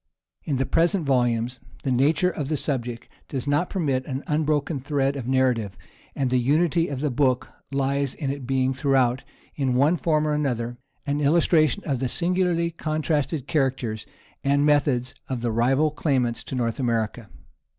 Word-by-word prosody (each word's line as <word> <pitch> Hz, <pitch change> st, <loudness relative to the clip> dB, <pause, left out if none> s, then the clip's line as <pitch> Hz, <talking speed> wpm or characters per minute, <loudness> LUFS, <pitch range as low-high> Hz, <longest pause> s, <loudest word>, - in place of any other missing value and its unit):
In 145 Hz, -, 0 dB
the 135 Hz, +1 st, 0 dB
present 170 Hz, +3 st, +2 dB
volumes 120 Hz, -2 st, +1 dB, 0.2 s
the 135 Hz, -, 0 dB
nature 150 Hz, +8 st, +3 dB
of 150 Hz, -5 st, -4 dB
the 155 Hz, +1 st, -1 dB
subject 120 Hz, -5 st, -3 dB, 0.2 s
does 135 Hz, -2 st, -3 dB
not 145 Hz, +5 st, +1 dB
permit 140 Hz, -9 st, 0 dB
an 135 Hz, -1 st, -4 dB
unbroken 150 Hz, -1 st, 0 dB
thread 140 Hz, 0 st, 0 dB
of 130 Hz, -4 st, -5 dB
narrative, 125 Hz, -6 st, +1 dB, 0.4 s
and 130 Hz, -3 st, 0 dB
the 130 Hz, -, +3 dB
unity 165 Hz, +6 st, +2 dB
of 140 Hz, -2 st, -4 dB
the 150 Hz, -2 st, 0 dB
book 130 Hz, -1 st, +1 dB, 0.2 s
lies 140 Hz, 0 st, 0 dB
in 140 Hz, -4 st, -2 dB
its 140 Hz, -1 st, -6 dB
being 130 Hz, +1 st, +1 dB
throughout, 130 Hz, -1 st, +1 dB, 0.3 s
in 130 Hz, -3 st, 0 dB
one 145 Hz, +7 st, +3 dB
form 155 Hz, -2 st, +1 dB
or 150 Hz, -, +1 dB
another, 120 Hz, -5 st, -2 dB, 0.3 s
an 145 Hz, +1 st, -1 dB
illustration 155 Hz, -1 st, +3 dB
of 135 Hz, -4 st, -1 dB
the 130 Hz, -, 0 dB
singularly 175 Hz, +2 st, 0 dB
contrasted 155 Hz, -3 st, -1 dB
characters 130 Hz, -8 st, -1 dB, 0.4 s
and 140 Hz, +1 st, +3 dB
methods 140 Hz, -4 st, +2 dB, 0.2 s
of 130 Hz, -3 st, -2 dB
the 120 Hz, -1 st, 0 dB
rival 135 Hz, +7 st, +2 dB
claimants 130 Hz, -6 st, 0 dB
to -, -, -5 dB
North 115 Hz, -1 st, -1 dB
America. 115 Hz, -3 st, -1 dB
135 Hz, 165 wpm, -24 LUFS, 125-150 Hz, 0.4 s, nature